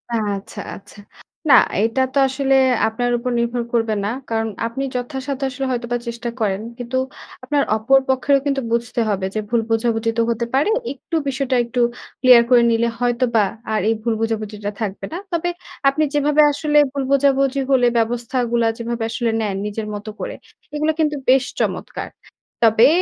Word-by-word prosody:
আচ্ছা, 205 -3 -3 0.2
আচ্ছা। 200 +1 -15 0.5
না - - +8 0.3
এটা 225 +4 +1
তো - - -1
আসলে 270 0 +1 0.3
আপনার 245 +2 -1
উপর 250 +1 -3
নির্ভর 235 0 -1
করবে 225 -2 +1
না। - - 0 0.2
কারণ 225 0 0 0.2
আপনি 265 +4 -4
যথাসাধ্য 265 +2 -4
আসলে 265 +1 -4
হয়তোবা 240 0 -2
চেষ্টা 235 0 -4
করেন। 200 -2 0 0.2
কিন্তু 245 +1 -3 0.5
আপনার 285 +2 +1
অপর 270 +5 +4
পক্ষেরও 275 +2 +3
কিন্তু 275 -1 0
বুঝতে 235 0 0
হবে, 195 -2 -1
যে - - +1
ভুল 235 -1 +2
বোঝাবুঝি 225 0 +1
তো - - +3
হতে 235 +1 -1
পারে। 285 +10 +2 0.2
একটু 280 +4 -7
বিষয়টা 265 -1 -1
একটু 245 +1 -4 0.4
ক্লিয়ার 250 -2 +8
করে 240 -1 +6
নিলে 230 +1 +2
হয়তোবা 240 -3 +2 0.3
আর 215 - +2
এই - - +3
ভুল 230 -1 +1
বোঝাবুঝিটা 215 -2 -3
থাকবে 200 -2 -3
না। - - -3 0.2
তবে 340 +1 0 0.4
আপনি 310 +3 0
যেভাবে 295 +1 +3
আসলে 295 +1 0
ভুল 275 -1 -2
বোঝাবুঝি 275 0 +3
হলে, 250 -2 +4
ব্যবস্থাগুলা 235 0 0
যেভাবে 235 0 -3
আসলে 230 -1 0
নেন, 200 -3 -1
নিজের 210 +1 -4
মত 205 +1 -6
করে। - - -4 0.4
এগুলো 305 +1 +1
কিন্তু 300 -1 +1
বেশ 265 0 +5 0.2
চমৎকার। - - -3 0.6
তবে 225 +2 +6
240 Hz, 165 wpm, -20 LUFS, 225-270 Hz, 0.6 s, না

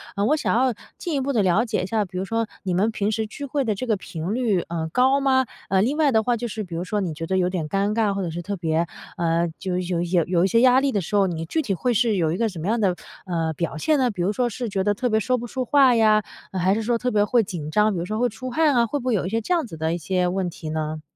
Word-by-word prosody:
呃， 200 - +1
我 295 - +3
想 300 - 0
要 255 0 +2 0.2
进 345 - -4
一 275 - 0
步 280 +2 -1
地 215 -5 +2
了 185 +5 +3
解 225 -6 -1
一 - - -1
下， 215 +2 0
比 185 -1 -8
如 185 - -2
说 225 +2 -1 0.2
你 185 -3 -1
们 195 +5 +2
平 210 -1 -1
时 220 0 -1
聚 285 +6 -7
会 280 +1 -1
的 220 -4 0
这 225 - -4
个 225 -3 +1
频 180 -1 -5
率， 225 -7 +1
呃， 165 -1 -3
高 260 +5 +3
吗？ 265 -1 +3 0.2
呃， 190 0 +3
另 270 +7 0
外 305 -3 +3
的 220 -2 +3
话 245 +2 +1
就 240 +1 -3
是 220 -1 -4
比 175 -4 -7
如 170 - -2
说 205 +3 -2
你 180 -5 -2
觉 165 +1 -6
得 190 - 0
有 180 - +2
点 175 -4 -3
尴 200 +3 0
尬， 220 -2 +2
或 195 - -2
者 170 - -3
是 175 - -4
特 200 +4 -4
别 165 -1 0 0.3
呃， 170 -1 +1
就 185 -2 -2
有 180 -1 -1
有 175 0 +2
有 - - -8
有 175 0 +2
一 - - +3
些 230 +3 +3
压 255 0 +6
力 275 0 +1
的 205 - 0
时 190 +4 -4
候， 195 -1 +4
你 165 -2 -3
具 320 - -1
体 215 -10 -1
会 245 +7 0
是 225 -1 +2
有 160 -4 +1
一 175 - -2
个 230 -1 +1
什 185 - -10
么 160 - -5
样 225 +1 +1
的， 185 -3 +2 0.3
呃， 165 -2 -1
表 160 0 -3
现 300 - +2
呢？ 250 -2 +3
比 185 -5 -3
如 200 +4 +1
说 245 +3 0
是 240 +2 -4
觉 195 -2 -1
得 205 +1 +1
特 245 +3 -1
别 220 - +3
说 250 +4 +1
不 240 - -5
出 255 +2 -3
话 265 0 +5
呀， 215 -2 +4 0.3
还 185 +1 +2
是 225 - -1
说 235 +2 +1
特 250 +2 -1
别 205 -2 +3
会 230 +2 +3
紧 175 -7 -6
张， 210 +5 +3
比 175 - -2
如 170 - -3
说 215 +3 -3
会 245 +2 +2
出 255 +3 -7
汗 310 +3 +3
啊， 235 -2 +3
会 290 - -2
不 245 - -9
会 250 - +2
有 185 -3 0
一 - - -3
些 225 +2 -1
这 295 - -1
样 335 -7 0
子 165 -7 -9
的 160 +1 -1
一 - - -1
些 180 +2 0
问 185 0 -1
题 160 -2 -8
呢？ 155 0 -3
205 Hz, 350 characters per minute, -23 LUFS, 180-240 Hz, 0.3 s, 压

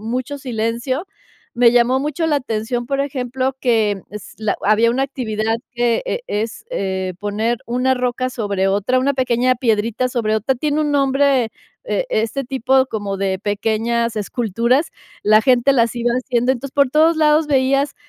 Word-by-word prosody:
mucho 250 +6 -4
silencio. 250 - -2 0.5
Me 240 -1 +5
llamó 245 +2 +3
mucho 300 +3 -2
la 300 -2 +2
atención, 240 -1 -3
por 275 +1 -1
ejemplo, 260 -1 -2
que 220 -5 +1
es 210 0 -10
la 215 -2 -1
había 220 +3 +3
una 265 +3 0
actividad 225 -5 -2 0.2
que 240 -1 +1
e - - -2
es, 220 - -3
eh, 190 - -2
poner 215 +3 -1
una 250 +2 +1
roca 250 0 -1
sobre 200 -5 -1
otra, 205 +6 +1
una 275 +2 +1
pequeña 255 -1 +1
piedrita 230 0 0
sobre 225 -4 -1
otra, 220 +5 0
tiene 295 +4 -1
un 300 -1 0
nombre, 275 -3 +2 0.3
eh, - - -1
este 230 - -1
tipo 265 +1 +2
como 205 -4 -4
de 190 -1 -1
pequeñas 225 +3 -1
esculturas, 235 - 0 0.3
la 215 +1 +5
gente 260 +2 +3
las 235 -2 +2
iba 240 0 0
haciendo. 255 0 +1
Entonces, 265 +2 -6
por 280 -2 +4
todos 315 +4 +3
lados 305 0 +3
veías 275 0 +1
245 Hz, 165 wpm, -19 LUFS, 220-265 Hz, 0.5 s, Me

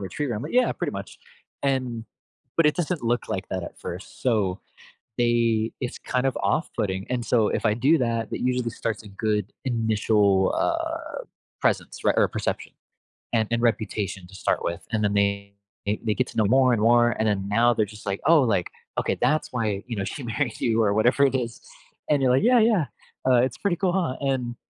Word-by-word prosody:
retriever." 120 +6 -3
I'm, 105 - -4
like, 150 - -6
"Yeah, 250 0 +4
pretty - - -3
much," - - -7 0.4
and 125 -4 -1 0.5
but 165 - +6
it 150 - +3
doesn't 175 -4 -1
look 120 +1 0
like 95 0 -3
that 95 -2 -2
at - - -10
first, - - -8
so 105 -7 +1 0.6
they 115 -2 +2
it's 125 - -4
kind 125 +1 -1
of 130 - 0
off 155 0 0
putting, 95 -3 -2
and 120 -2 -1
so 115 -4 +3
if - - -2
I 105 - +3
do 140 +7 +3
that, 115 -2 -1
that - - -4
usually 125 -1 0
starts 110 -1 -3
a - - -10
good 105 0 -2
initial, 105 -5 +2
uh, - - -2 0.4
presence, - - 0
right, - - +4
or - - +5
perception - - -3 0.6
and 110 -2 +2
and 120 0 +1
reputation 105 -5 -1
to 95 - -15
start - - -1
with, 85 0 -3
and 105 -1 +1
then 100 - +2
they 100 0 +1 0.4
they 105 +1 -1
get 130 - 0
to - - -12
know 110 - +4
more 130 +3 +4
and 110 - +1
more, 120 +1 +5
and 110 0 +1
then 100 -2 0
now 120 +3 +4
they're 110 - +2
just 105 0 -13
like, 95 0 -1
"Oh, 165 -2 +7
like, 100 -8 +1 0.3
okay, - - 0
that's 155 -2 +1
why, 105 -5 -1
you 120 -2 -4
know, 100 - -2
she 130 +9 -5
married 120 +1 -2
you," 115 -1 +2
or 100 -2 +2
whatever 120 +6 +4
it 135 - -1
is, 120 -2 -2 0.5
and 145 -2 +3
you're 130 - +3
like, 130 - +3
"Yeah, 245 +1 +5
yeah, 215 -8 +3 0.4
uh, 130 - +6
it's 130 -1 -1
pretty 190 -4 0
cool, 185 -1 +1
ha," 175 -8 0
and 130 -3 -1
115 Hz, 210 wpm, -25 LUFS, 105-130 Hz, 0.6 s, Oh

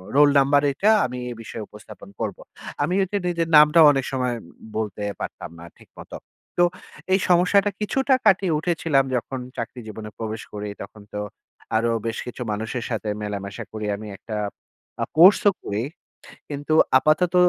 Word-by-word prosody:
Roll 145 0 +7
number 140 +1 +4
এইটা। 195 +10 +1 0.2
আমি 125 0 -5
এই - - -7
বিষয়ে 110 -1 -7
উপস্থাপন 105 -1 -13
করবো।" - - -4 0.4
আমি 165 +5 0
ঐযে 195 +2 -2
নিজের 170 -2 0
নামটাও 150 +2 +7
অনেক 135 -2 -1
সময় 125 -2 -1 0.4
বলতে 105 -2 -3 0.2
পারতাম - - -6
না 85 - -10
ঠিক - - -19
মতো। - - -9 0.4
তো 175 - +6 0.5
এই 190 - +4
সমস্যাটা 180 +3 +4
কিছুটা 265 +5 +1
কাটিয়ে 190 -4 +4
উঠেছিলাম 160 -4 +1
যখন 130 +2 -4 0.2
চাকরি 115 +2 -5
জীবনে 110 0 -7
প্রবেশ 110 -1 -4
করি, 105 0 -5
তখন 105 +2 -10
তো 105 - -3 0.6
আরো 115 +1 +2 0.2
বেশ 115 - -3
কিছু 125 +1 -8
মানুষের 110 +3 -3
সাথে 110 -3 -3
মেলামেশা 100 -1 -5
করি 110 -1 -4
আমি। 110 +1 -9
একটা 110 -2 -6 0.7
আ - - 0
কোর্স 185 +5 +8
ও - - +1
করি। 105 +2 -2 0.7
কিন্তু 145 +2 -2 0.2
আপাতত 155 +6 +2
130 Hz, 160 wpm, -23 LUFS, 110-165 Hz, 0.7 s, কোর্স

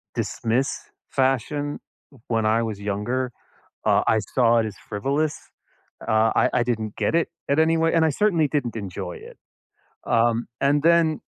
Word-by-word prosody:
dismiss 120 +4 -1 0.3
fashion 140 +2 0 0.5
when 115 -2 0
I 110 +2 +2
was 105 -2 -5
younger, 105 +6 -2 0.5
uh, - - +3
I 110 - +3
saw 120 +1 +2
it 110 - 0
as 105 - -8
frivolous. 140 +9 -1 0.7
Uh, 110 0 +3
I - - +3
I 125 - +2
didn't 110 -3 -3
get - - 0
it 170 - +1 0.2
at 140 - +2
any 160 +1 +4
way, 165 0 +2
and 165 -1 +4
I - - +3
certainly 165 -1 +2
didn't 130 -5 -2
enjoy 95 -3 -5
it. - - -12 0.7
Um, 115 0 +2
and 140 +1 +3
then 165 -2 +4
125 Hz, 160 wpm, -23 LUFS, 110-150 Hz, 0.7 s, any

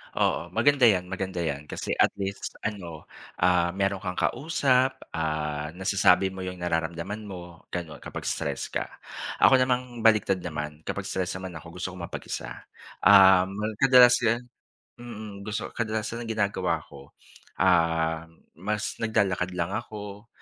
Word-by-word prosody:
Oo, 85 - +1
maganda 140 -4 +5
yan, 90 -3 +2
maganda 95 -2 -3
yan 75 -1 -3
kasi - - -5
at - - +4
least 100 0 -5
ano, 90 -7 -5 0.4
ah, 90 -1 +3
meron 100 0 0
kang 90 -2 -4
kausap, 130 -4 +2 0.2
ah, 75 -2 -2
nasasabi 95 0 +3
mo 95 - -9
yung 90 -1 -6
nararamdaman 85 +5 -2
mo 90 -3 -10
ganon 85 -4 -5
kapag - - -7
stress - - -3
ka. - - -2 0.5
Ako 130 - +7
namang 125 -1 0
baliktad 105 -4 +4
naman 75 -3 -5
kapag - - -3
stress 90 -1 -3
naman 95 0 -6
ako 85 +3 -13
gusto 90 +1 -4
kong 90 -2 -7
mapag-isa. - - -6 0.4
Um, 95 -1 +7
well 110 +1 -2
kadalasan 125 -2 +6 0.5
mm, 110 -4 -8
gusto 105 +1 -4
kadalasan 110 0 -3
ang - - -8
ginagawa 105 -3 0
ko, 70 0 -15 0.4
um, 80 -2 +2 0.3
mas 105 +3 -3
naglalakad 100 -5 +1
lang 85 +2 -1
ako, 105 0 -6
95 Hz, 140 wpm, -27 LUFS, 85-110 Hz, 0.5 s, Ako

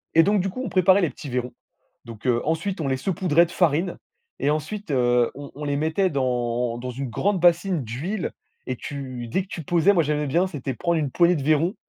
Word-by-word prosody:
et 165 - +8
donc 205 -1 +2
du 195 - -1
coup 255 +7 -6
on 235 - -3
préparait 190 +1 +4
les 170 - +2
petits 145 - -9
vairons, 125 0 -2 0.5
donc 115 -1 -11
heu, 120 -1 +2
ensuite 165 +3 -1
on 140 - -1
les 130 -1 0
saupoudrait 170 0 +2
de 170 - -11
farine, 175 +1 +1 0.4
et 145 - +1
ensuite, 160 +4 -3
heu, 120 -2 +3
on 140 0 -9
on 150 - -7
les 140 0 0
mettait 160 +5 +1
dans 120 -3 -1
dans 125 +1 -5
une 130 0 -5
grande 195 - 0
bassine 175 -2 +3
d'huile, 160 - -3 0.4
et 130 - -2
tu 130 -3 -6
dès 190 +12 0
que - - -18
tu 165 - -6
posais 175 +6 +3
moi 170 -3 +3
j'aimais 150 0 -1
bien, 175 +7 +2
c'était 140 -6 -4
prendre 170 +3 0
une 140 -4 -2
poignée 175 0 +4
de 140 - -3
vairons, 155 +5 +2
155 Hz, 225 wpm, -24 LUFS, 130-180 Hz, 0.5 s, et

